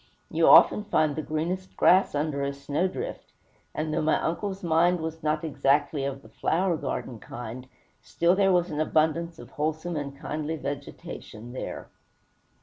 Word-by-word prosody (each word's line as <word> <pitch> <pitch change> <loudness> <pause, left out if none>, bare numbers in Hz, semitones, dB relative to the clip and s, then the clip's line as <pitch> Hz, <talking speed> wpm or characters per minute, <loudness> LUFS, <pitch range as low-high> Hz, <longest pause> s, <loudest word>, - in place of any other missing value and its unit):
You - - +3
often 210 - +7
find 155 -7 +2
the 155 - -2
greenest 170 +5 -3
grass 185 -3 +5
under 145 -1 -1
a 140 0 -1
snowdrift; 165 - -3 0.4
and 155 0 -2
though - - +1
my 155 0 +2
uncle's 190 +3 -3
mind 170 +1 +3
was 160 0 -5
not 155 +1 0
exactly 145 -1 +1
of 140 0 -4
the - - -15
flower 175 +1 0
garden 125 -6 -4
kind, 120 +3 -8 0.3
still 170 +2 +2
there 195 0 +4
was 175 -1 +2
an 150 - -3
abundance 160 +2 +1
of - - -12
wholesome 155 +3 -2
and 140 -2 -4
kindly 155 +2 -3
vegetation 135 -5 -7
there. 130 - -6
155 Hz, 155 wpm, -27 LUFS, 140-170 Hz, 0.4 s, often